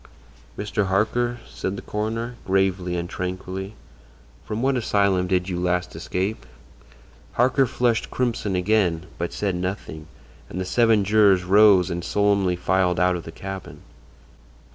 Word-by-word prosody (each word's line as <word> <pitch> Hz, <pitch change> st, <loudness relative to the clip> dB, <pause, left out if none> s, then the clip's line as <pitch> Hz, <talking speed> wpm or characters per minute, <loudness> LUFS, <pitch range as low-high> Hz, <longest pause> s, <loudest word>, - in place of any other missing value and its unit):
"Mr. 105 Hz, -1 st, -1 dB
Harker," 120 Hz, +5 st, +1 dB
said 95 Hz, -, -4 dB
the -, -, -6 dB
coroner, 115 Hz, +3 st, -3 dB
gravely 95 Hz, -2 st, 0 dB
and 85 Hz, 0 st, -3 dB
tranquilly, 95 Hz, +2 st, -5 dB, 0.7 s
"from 110 Hz, +3 st, -4 dB
what 135 Hz, 0 st, +2 dB
asylum 100 Hz, -6 st, +1 dB
did 90 Hz, 0 st, 0 dB
you 90 Hz, -2 st, -3 dB
last 90 Hz, -1 st, -1 dB
escape?" 95 Hz, +6 st, -3 dB, 0.9 s
Harker 130 Hz, +2 st, +3 dB
flushed 120 Hz, -1 st, 0 dB
crimson 115 Hz, -6 st, -1 dB
again, 90 Hz, -3 st, +1 dB
but 85 Hz, 0 st, -2 dB
said 100 Hz, -2 st, -1 dB
nothing, 90 Hz, -4 st, -5 dB, 0.4 s
and 90 Hz, -, -5 dB
the 95 Hz, -, -2 dB
seven 110 Hz, +1 st, +3 dB
jurors 100 Hz, -2 st, +4 dB
rose 95 Hz, -1 st, +5 dB
and 85 Hz, 0 st, -3 dB
solemnly 100 Hz, -1 st, +2 dB
filed 90 Hz, 0 st, +1 dB
out 90 Hz, 0 st, +3 dB
of 85 Hz, -, -6 dB
the 80 Hz, -, -7 dB
cabin. 95 Hz, +2 st, -8 dB
95 Hz, 140 wpm, -23 LUFS, 90-105 Hz, 0.9 s, rose